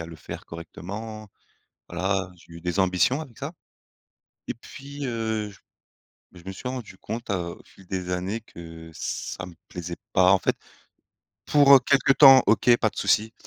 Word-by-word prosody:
à 80 Hz, -, -6 dB
le 85 Hz, -1 st, -10 dB
faire -, -, -9 dB
correctement. 105 Hz, +6 st, -8 dB, 0.6 s
Voilà, 95 Hz, +1 st, -1 dB
j'ai 85 Hz, 0 st, -18 dB
eu 85 Hz, -, -9 dB
des 90 Hz, +2 st, -3 dB
ambitions 95 Hz, -, +2 dB
avec 130 Hz, -8 st, -11 dB
ça, 140 Hz, +4 st, -5 dB, 1.0 s
et -, -, -2 dB
puis, 140 Hz, +4 st, -9 dB
heu 110 Hz, -3 st, -2 dB
j 100 Hz, -, -17 dB, 0.7 s
beh 90 Hz, -, -15 dB
je -, -, -20 dB
me -, -, -4 dB
suis 125 Hz, +6 st, -6 dB
rendu 120 Hz, -7 st, -7 dB
compte, 115 Hz, +1 st, -6 dB
heu, 85 Hz, -3 st, -2 dB
au -, -, -17 dB
fil 95 Hz, -, -19 dB
des 90 Hz, -1 st, -4 dB
années 95 Hz, +5 st, -2 dB
que 80 Hz, -4 st, -11 dB
ça 90 Hz, +3 st, -5 dB
me 90 Hz, -, -12 dB
plaisait 90 Hz, -1 st, -6 dB, 0.2 s
pas 90 Hz, +1 st, +5 dB
en 95 Hz, -, +5 dB
fait. -, -, 0 dB, 0.9 s
Pour 140 Hz, -2 st, +7 dB
quelque 140 Hz, 0 st, +4 dB
temps 135 Hz, -2 st, +9 dB
OK 115 Hz, +3 st, +5 dB
pas 110 Hz, -, +1 dB
de -, -, -19 dB
souci, 110 Hz, +1 st, +2 dB
100 Hz, 180 wpm, -25 LUFS, 90-120 Hz, 1.0 s, temps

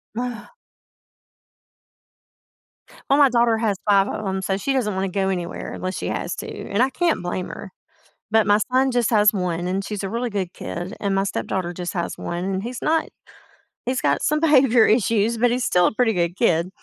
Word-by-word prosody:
Ugh. 245 Hz, -1 st, -5 dB, 2.6 s
Well, 275 Hz, +1 st, +4 dB
my 280 Hz, -2 st, +7 dB
daughter 235 Hz, -2 st, +3 dB
has 215 Hz, -3 st, 0 dB
5 195 Hz, -1 st, +5 dB
of 215 Hz, -, -4 dB
‘em, 190 Hz, 0 st, -2 dB
so 190 Hz, 0 st, -1 dB
she 270 Hz, +8 st, -1 dB
doesn't 235 Hz, -6 st, 0 dB
wanna 190 Hz, +1 st, -1 dB
go 190 Hz, +1 st, -1 dB
anywhere, 175 Hz, -2 st, -4 dB
unless 185 Hz, +1 st, -4 dB
she -, -, -4 dB
has -, -, -3 dB
to, -, -, -6 dB, 0.2 s
and 200 Hz, +4 st, +1 dB
I 260 Hz, -, +2 dB
can't 330 Hz, +5 st, 0 dB
blame 180 Hz, +1 st, -3 dB
her, 195 Hz, -, -9 dB, 0.6 s
but 220 Hz, 0 st, +3 dB
my 205 Hz, 0 st, +4 dB
son 260 Hz, +1 st, +3 dB
just 245 Hz, -3 st, +1 dB
has 210 Hz, -2 st, +5 dB
1, 180 Hz, -3 st, -2 dB
and 190 Hz, +2 st, -2 dB
she's 210 Hz, -1 st, -4 dB
a 195 Hz, -, -3 dB
really 235 Hz, +1 st, -2 dB
good 190 Hz, -4 st, -3 dB
kid, 175 Hz, +4 st, -6 dB
and 200 Hz, -1 st, 0 dB
my 195 Hz, 0 st, +1 dB
stepdaughter 180 Hz, -, -3 dB
just 175 Hz, 0 st, -5 dB
has 170 Hz, -2 st, -3 dB
1, 175 Hz, +1 st, -4 dB
and 190 Hz, 0 st, -2 dB
he's 240 Hz, +2 st, -6 dB
not 320 Hz, +1 st, +1 dB, 0.8 s
he's 255 Hz, +1 st, 0 dB
got -, -, +1 dB
some 305 Hz, +1 st, +2 dB
behavior 265 Hz, -7 st, +5 dB
issues, 225 Hz, 0 st, +2 dB
but 240 Hz, +1 st, +3 dB
he's 250 Hz, +1 st, 0 dB
still 180 Hz, -1 st, +3 dB
a -, -, 0 dB
pretty 225 Hz, 0 st, +2 dB
good 175 Hz, -1 st, -1 dB
kid, 170 Hz, -6 st, +2 dB
205 Hz, 200 wpm, -22 LUFS, 185-245 Hz, 2.6 s, my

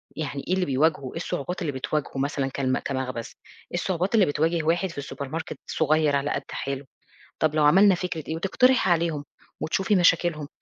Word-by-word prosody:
يعني 145 Hz, -3 st, -4 dB
إيه 180 Hz, -, +1 dB
اللي 185 Hz, -1 st, +1 dB
بيواجهه؟ 140 Hz, -1 st, +1 dB
إيه -, -, -6 dB
الصعوبات 175 Hz, +6 st, -4 dB
اللي 155 Hz, -, -1 dB
بتواجهه 140 Hz, +1 st, -3 dB
مثلًا 140 Hz, 0 st, -1 dB
كلمَ 130 Hz, -1 st, 0 dB
كمخبز؟ 130 Hz, -3 st, -4 dB, 0.4 s
إيه 175 Hz, -, -1 dB
الصعوبات 185 Hz, +3 st, 0 dB
اللي 210 Hz, -4 st, +6 dB
بتواجه 160 Hz, +2 st, 0 dB
واحد 170 Hz, +4 st, +1 dB
في 155 Hz, -4 st, -6 dB
الsupermarket 140 Hz, +3 st, -5 dB
صغير 155 Hz, -1 st, +2 dB
على 140 Hz, +1 st, 0 dB
قد 140 Hz, -, -2 dB
حاله؟ 140 Hz, 0 st, -4 dB, 0.5 s
طَب 155 Hz, -1 st, +1 dB
لو 150 Hz, -, +4 dB
عملنا 190 Hz, +6 st, +6 dB
فكرة 175 Hz, -3 st, -4 dB
إيه؟ 160 Hz, -, -2 dB
وتقترحي 250 Hz, +7 st, +3 dB
عليهم 165 Hz, -4 st, 0 dB, 0.4 s
وتشوفي 195 Hz, +6 st, +1 dB
مشاكلهم، 170 Hz, -4 st, +3 dB
155 Hz, 175 wpm, -25 LUFS, 140-175 Hz, 0.5 s, اللي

